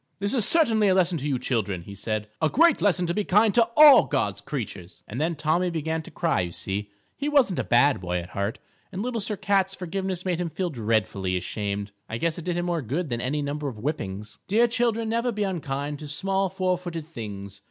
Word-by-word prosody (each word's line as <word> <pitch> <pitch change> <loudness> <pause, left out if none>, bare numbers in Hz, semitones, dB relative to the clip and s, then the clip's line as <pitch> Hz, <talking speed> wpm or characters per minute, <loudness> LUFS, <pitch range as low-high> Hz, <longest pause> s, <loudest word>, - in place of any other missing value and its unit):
"This 200 +4 -1
is 235 -6 +3
certainly 225 -11 +3
a 190 - +4
lesson 180 -3 +2
to 140 - -3
you 135 -3 +1
children," 105 -8 -2
he 100 - -10
said; 105 +1 -3
"a 160 - +3
great 335 - +4
lesson 185 -3 +3
to 170 - -1
be 210 - 0
kind 210 +2 +4
to 235 -1 +4
all 300 -2 +9
God's - - -1
creatures." 100 -9 -6
And 120 +7 -4
then 165 +2 0
Tommy 160 +5 +1
began 160 -1 -2
to - - -12
cry. 165 - 0
You 90 -1 -3
see, 100 +4 -4 0.3
he 290 +2 -2
wasn't 265 - +3
a - - 0
bad 125 -2 +3
boy 90 -1 -2
at 90 0 -5
heart, 100 +2 -2 0.3
and 190 +2 -4
Little 240 -2 -2
Sir 205 +1 -3
Cat's 195 -1 +1
forgiveness 185 0 -4
made 180 -2 0
him 175 - -2
feel 180 +1 -3
dreadfully 105 -6 0
ashamed. 100 +2 -3 0.2
I 115 - -3
guess 165 +5 -1
it 170 - -9
did 175 -1 -1
him 175 - -1
more 170 -2 -1
good 145 +7 -3
than 120 -1 -2
any 145 +4 -1
number 145 +1 -3
of 130 - -5
whippings. 105 -6 -4
_Dear 230 +4 +4
children, 230 -2 +1
never 235 +2 0
be 210 -2 -2
unkind 145 -6 -3
To 150 - -8
small 190 +6 -1
four 185 -1 0
footed 170 -3 -6
things. 100 - -8
160 Hz, 225 wpm, -25 LUFS, -, 0.3 s, all